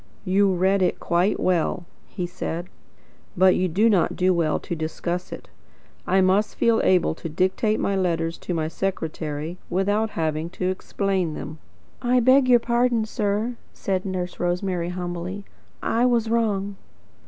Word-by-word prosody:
"You 195 +1 +3
read 190 +2 +2
it 180 - +1
quite 175 +4 +1
well," 175 0 0 0.2
he 180 - -4
said, 175 -1 -4 0.7
"but 185 0 +6
you 185 - +1
do 195 +7 +3
not 200 -6 +2
do 185 0 +3
well 165 -3 +1
to 170 - -5
discuss 170 +3 -3
it. - - -8 0.6
I 190 +1 +4
must 195 +3 +2
feel 230 -1 +3
able 180 -3 +3
to 165 - -7
dictate 190 +6 +1
my 200 - 0
letters 165 -3 -1
to 180 - -4
my 155 -1 -1
secretary, 160 -2 -4
without 205 +4 +1
having 160 0 -1
to 185 0 0
explain 185 -3 -1
them." 155 - -7 0.4
"I 250 +1 +3
beg 255 +2 +5
your 245 -1 +7
pardon, 235 -1 +1
sir," 215 +3 -1 0.2
said 190 -1 -2
Nurse 185 -2 -4
Rosemary 175 0 -1
humbly. 180 +2 -5 0.4
"I 235 +2 +2
was 230 -2 +1
wrong." 205 -4 0
185 Hz, 155 wpm, -24 LUFS, 175-210 Hz, 0.7 s, your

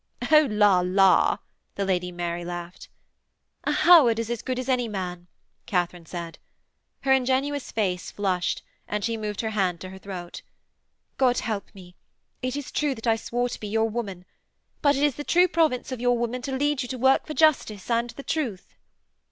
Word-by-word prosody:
'Oh, 305 -1 +7
la, 205 -3 +4
la,' 185 -1 +4 0.4
the 200 - -1
Lady 180 -2 0
Mary 175 0 -3
laughed. 175 0 -7 0.8
'A - - +1
Howard 295 -11 +6
is 230 0 -2
as 235 -2 -3
good 255 -1 -3
as 255 0 -4
any 250 -2 +1
man,' 180 -4 -5 0.4
Katharine 175 -2 -1
said. 170 -1 -7 0.6
Her 270 - 0
ingenuous 265 +2 0
face 185 -5 -1
flushed, 185 -3 -1 0.2
and 210 0 -2
she 230 0 0
moved 210 -2 -3
her 220 -1 -2
hand 185 -5 0
to 185 - -7
her 190 0 -10
throat. 180 -3 -7 0.8
'God 250 -2 +3
help 215 -3 -2
me: 180 -2 -13 0.5
it 255 +1 -2
is 285 -2 -5
true 295 -2 0
that 225 - -9
I 225 -1 +4
swore 245 +2 -2
to - - -6
be 210 - -6
your 220 +1 +1
woman. 200 -6 -5 0.6
But 285 -1 +4
it 275 - 0
is 295 -4 +2
the 295 - -4
true 355 +4 +4
province 315 -8 +1
of 255 -2 -4
your 245 0 +3
woman 240 +1 -2
to 270 +2 -5
lead 285 +1 0
you 245 - -4
to 260 - -4
work 265 +2 +3
for 305 - -5
justice 245 -10 +2
and 235 +1 +1
the 280 - -9
truth.' 245 - -3
225 Hz, 190 wpm, -25 LUFS, 185-260 Hz, 0.8 s, Oh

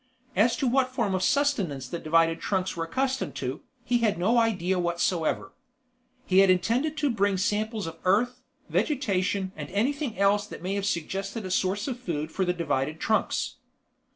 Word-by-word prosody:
As 225 +5 +4
to 280 - -1
what 255 +1 +2
form 235 -7 -1
of 185 - 0
sustenance 195 - +1
the 170 - -4
divided 165 +1 +2
trunks 190 -2 -1
were 165 -1 -2
accustomed 260 +8 -1
to, 130 +3 -4 0.2
he 245 -1 +2
had 215 -5 +1
no 220 +8 +3
idea 190 -5 +1
whatsoever. 170 -1 0 0.7
He 185 0 +4
had 195 -1 +6
intended 235 - +2
to 295 -3 +1
bring 200 -3 +1
samples 210 +2 -1
of 165 0 -7
earth, 245 +7 +2 0.3
vegetation 200 -8 0
and - - -6
anything 250 - -1
else 200 +1 +3
that 195 - -9
may 190 +2 -1
have 200 0 -1
suggested 195 +5 -3
a 185 - -4
source 190 +4 0
of 250 -3 -3
food 160 -8 -3
for 190 - -1
the 180 - +1
divided 155 -3 -1
trunks. 220 - 0
195 Hz, 175 wpm, -27 LUFS, 180-235 Hz, 0.7 s, had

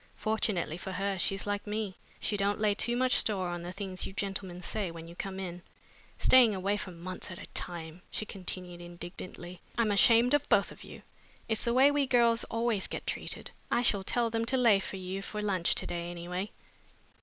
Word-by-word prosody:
"Fortunately 210 -7 0
for 190 +1 -6
her, 195 0 -1
she's 195 +2 +2
like 205 0 -2
me 210 -2 -2 0.2
she 210 - 0
don't 200 +1 +1
lay 210 -1 +3
too 240 +3 +2
much 255 +1 +3
store 195 -8 +2
on 175 0 -3
the 175 +1 -5
things 190 -1 -5
you - - -9
gentlemen 195 -2 -3
say 195 +1 -1
when 165 0 -8
you 170 - -11
come 190 +1 -4
in. 180 -2 -5 0.6
Staying 240 -5 +6
away 195 +2 0
for 205 - -4
months 180 +1 -7
at 170 - -7
a - - -8
time!" 170 0 -5
she 215 - -3
continued 180 -3 -6
indignantly. 175 0 -8 0.2
"I'm 230 -3 +3
ashamed 230 +5 +6
of 290 0 +2
both - - +4
of - - -12
you. - - -11 0.4
It's 220 -1 0
the 235 0 +1
way 270 +3 +7
we 285 -1 +2
girls 235 -2 +4
always 230 -3 0
get - - -5
treated. - - -4 0.2
I 240 +1 +2
shall 200 -5 +3
tell 235 +3 +1
them 225 0 0
to 260 +3 +2
lay 230 -6 +6
for 195 - -5
you 185 +1 -4
for 210 +1 -5
lunch 195 -5 +2
to - - -2
day, 175 0 -3
anyway." 180 +3 -4
195 Hz, 205 wpm, -31 LUFS, 180-220 Hz, 0.6 s, way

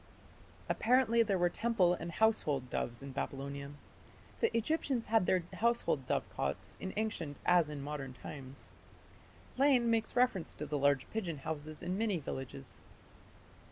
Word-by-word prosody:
Apparently 235 -1 +4
there 205 -4 +2
were 175 0 +3
temple 190 -2 +2
and 170 -1 -4
household 150 - +2
doves 120 +2 -2
in 140 - -6
Babylonia. 140 +1 -4 0.7
The 460 - +2
Egyptians 260 -1 0
had 220 -4 +3
their 185 -2 +3
household 230 - +1
dovecots 95 +9 -2
in 190 - -4
ancient 170 -10 -2
as 175 -3 +5
in 145 -2 -5
modern 140 -3 -5
times. 135 0 -8 0.9
Lane 260 -4 +5
makes 225 -1 +1
reference 245 -8 +2
to 150 - -5
the 150 0 -2
large 140 -1 +3
pigeon 180 -8 -2
houses 155 +2 -5
in 185 +3 -1
many 215 -4 +1
villages. 130 - -6
170 Hz, 140 wpm, -34 LUFS, 140-225 Hz, 0.9 s, as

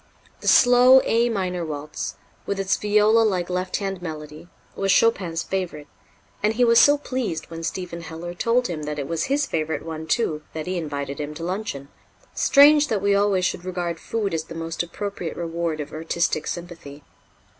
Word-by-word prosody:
The - - -8
slow 250 +1 +7
A 235 +1 +2
minor 185 -5 -2
"Waltz," 150 -1 -5 0.3
with 200 -1 -2
its 195 0 +1
viola 210 +2 +3
like 185 -5 0
left 180 +1 -1
hand 195 -2 -4
melody, 155 -1 -8 0.3
was 195 0 +1
Chopin's 185 -7 +2
favorite, 180 -6 -4 0.6
and 210 +1 +2
he 245 +1 +4
was 235 0 +6
so 290 +3 +6
pleased 250 - -4
when 165 0 -6
Stephen 170 0 -5
Heller 165 +1 -7
told 235 +7 +1
him 165 -4 -4
that 150 0 -4
it 140 -2 -3
was 165 -1 -1
his 280 +2 +1
favorite 160 -1 -3
one, 160 -1 -6
too, 155 -5 0
that 155 -1 -5
he 185 - -3
invited 140 -4 -4
him 150 +1 -5
to 165 - -7
luncheon. 175 -7 -4 0.4
(Strange 295 +1 +6
that 205 -3 -1
we 200 0 +3
always 200 -2 +2
should 175 - -2
regard 175 -2 -3
food 210 -5 -3
as 160 -1 -2
the 165 - -10
most 165 0 -3
appropriate 180 0 -5
reward 170 -1 -3
of 150 0 -6
artistic 160 0 -1
sympathy!) 170 -5 -7
175 Hz, 180 wpm, -23 LUFS, 160-205 Hz, 0.6 s, slow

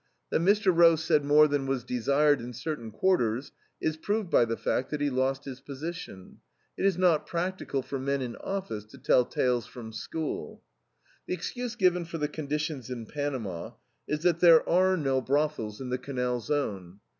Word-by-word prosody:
That - - +2
Mr. 195 0 +3
Roe 165 -1 +7
said 155 -2 +2
more 150 +1 +6
than 145 -2 -1
was 135 -2 -1
desired 140 +3 +2
in 120 +1 -7
certain 125 -2 -4
quarters 125 - +1 0.3
is 155 0 -1
proved 205 +2 -2
by 120 - +5
the 115 0 -3
fact 130 - -1
that 150 - -3
he 145 -1 0
lost 130 +1 0
his 130 -1 -7
position. 140 - -8 0.4
It - - -2
is 190 -3 +1
not 175 -4 +3
practical 170 -6 -2
for 135 - -4
men 140 +1 0
in 120 -2 -5
office 190 - -4
to 105 - -15
tell 125 - +3
tales 125 -2 0
from 115 -3 -9
school. 125 - -5 0.6
The - - -1
excuse 240 +7 -5
given 180 -5 +2
for 165 0 -6
the 150 -1 0
conditions 150 -3 -3
in 120 -3 -5
Panama 125 - -4 0.3
is 150 +1 -2
that 175 -2 +3
there 170 -2 +7
are 185 +2 +3
no 135 -4 +1
brothels 135 -6 -1
in 130 -2 -5
the 125 - -1
Canal 125 -2 -2
Zone. 100 -8 -3
145 Hz, 180 wpm, -28 LUFS, 125-165 Hz, 0.6 s, Roe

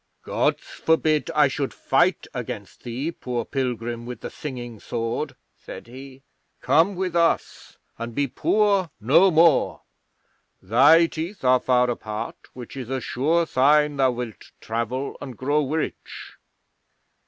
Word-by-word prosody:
'"Gods - - 0
forbid 155 -2 +1
I 150 -2 +5
should 135 0 -3
fight 175 +7 +1
against 120 -6 -7
thee, 130 +7 -4
poor 125 -7 -4
Pilgrim 120 -3 -3
with 125 - -7
the - - -6
Singing 120 -6 -7
Sword," 115 +7 -3 0.2
said - - -10
he. 130 +2 -12 0.4
"Come 175 +6 +3
with 180 -1 -3
us 170 -1 0 0.2
and 115 0 -6
be 145 - +1
poor 200 - +1
no 160 - +5
more. 165 -3 +3 0.8
Thy 140 - +5
teeth 165 +4 -6
are 130 0 +5
far 125 -1 +2
apart, 110 -3 -5
which 125 0 -10
is 130 -3 -6
a 135 0 -1
sure 155 +8 +1
sign 150 +1 +3
thou 135 -1 +4
wilt 120 -3 -6
travel 115 +4 -3
and 125 -5 -8
grow 145 +1 0
rich." 155 +1 -4
135 Hz, 135 wpm, -24 LUFS, 120-155 Hz, 0.8 s, I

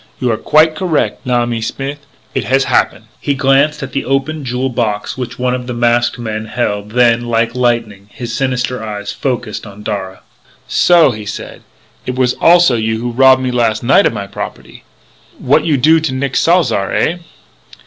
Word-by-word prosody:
You 125 -2 0
are 110 - -1
quite 155 +5 +3
correc', 165 -3 0
l'ami 120 -2 0
Smith. 140 +5 -5 0.3
It - - -1
has 135 +2 +2
happen." - - 0 0.2
He 140 - -1
glanced 140 +2 +2
at 130 - -6
the - - -2
open 135 +3 -1
jewel 125 +1 -2
box 110 -4 -2
which 125 -2 -6
one 125 0 0
of 125 -1 -4
the 125 - -4
masked 120 +1 +1
men 110 -2 -4
held, 105 -2 -3
then, 120 -1 +3
like 115 0 0
lightning, 115 -5 -1
his 120 -2 -6
sinister 125 -2 -2
eyes 105 -1 -5
focussed 120 -5 -4
on 100 +1 -12
Darragh. 95 -2 -5 0.5
"So," 175 -5 +4
he 105 -2 -7
said, - - -7 0.5
"it 125 - -2
was 125 -1 +1
also 170 -6 +5
you 110 0 -1
who 120 +1 -3
rob 130 +2 +5
me 130 -1 -2
las' 115 -3 0
night 135 +11 +4
of - - -2
my 100 -2 -4
property.... 100 - -8 0.5
What - - +2
you 155 -4 +2
do 160 +5 +4
to 155 -4 -2
Nick 130 0 -2
Salzar, 165 - +2
eh?" 170 - 0
125 Hz, 180 wpm, -15 LUFS, 115-135 Hz, 0.5 s, also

